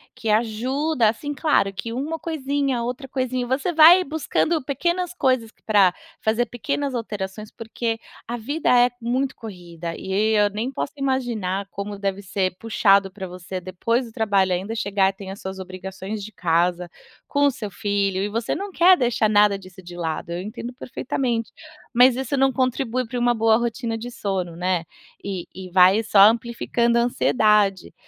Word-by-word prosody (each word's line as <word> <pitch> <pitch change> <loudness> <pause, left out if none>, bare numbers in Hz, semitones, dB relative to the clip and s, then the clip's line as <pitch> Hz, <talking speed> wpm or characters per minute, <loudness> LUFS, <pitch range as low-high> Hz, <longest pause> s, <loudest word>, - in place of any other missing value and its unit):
que 240 -3 -4
ajuda 240 +5 +1
assim, 290 +7 -4
claro 275 -9 +2
que 230 +4 -6
uma 300 +6 -3
coisinha, 280 -5 -1
outra 250 +3 -4
coisinha, 255 -1 -2
você 265 +7 -1
vai 335 +3 +8
buscando 315 0 -1
pequenas 345 +6 -1
coisas 255 -8 0
que - - -37
pra 200 -4 +4 0.3
fazer 225 +2 +1
pequenas 270 +4 -3
alterações, 210 -2 -5
porque 225 0 -4 0.3
a 235 - -3
vida 285 +8 -2
é 245 0 +5
muito 255 +3 -1
corrida 175 -5 -8
e 210 +3 0
eu 205 -1 +4
nem 220 +6 -3
posso 275 - -4
imaginar 235 -8 -1
como 200 0 -6
deve 200 0 -2
ser 185 -1 -1
puxado 200 -3 +3
pra 190 -1 -7
você 180 +1 -7
depois 230 +7 -1
do 225 - -13
trabalho 200 -4 +1
ainda 190 +5 -3
chegar, 200 -3 +1
tem 195 0 -10
as 195 +2 -7
suas 190 0 -6
obrigações 190 +2 -7
de 215 - -8
casa, 175 0 0 0.4
com 285 0 +2
o 285 - +4
seu 215 -4 -6
filho, 200 0 -1
e 205 - -2
você 230 +2 -2
não 400 +1 -5
quer 360 +1 +6
deixar 240 -4 +1
nada 205 -1 +4
disso 185 -1 -14
de 175 0 -10
lado. 165 -1 -4
Eu 175 - -3
entendo 235 +4 -7
perfeitamente. 245 -2 -3 0.4
Mas 250 +1 +6
isso 265 +1 -2
não 270 0 +3
contribui 255 -1 -1
para 245 +1 -4
uma 240 0 +3
boa 220 0 +4
rotina 235 0 -2
de 235 +2 -6
sono, 190 -7 -3
né. 180 -1 0 0.4
E 190 -3 -4
e 185 -1 -9
vai 185 +3 +5
só 210 -2 +3
amplificando 235 +2 +3
a - - +4
ansiedade. 210 -5 +2
220 Hz, 175 wpm, -23 LUFS, 195-255 Hz, 0.4 s, vai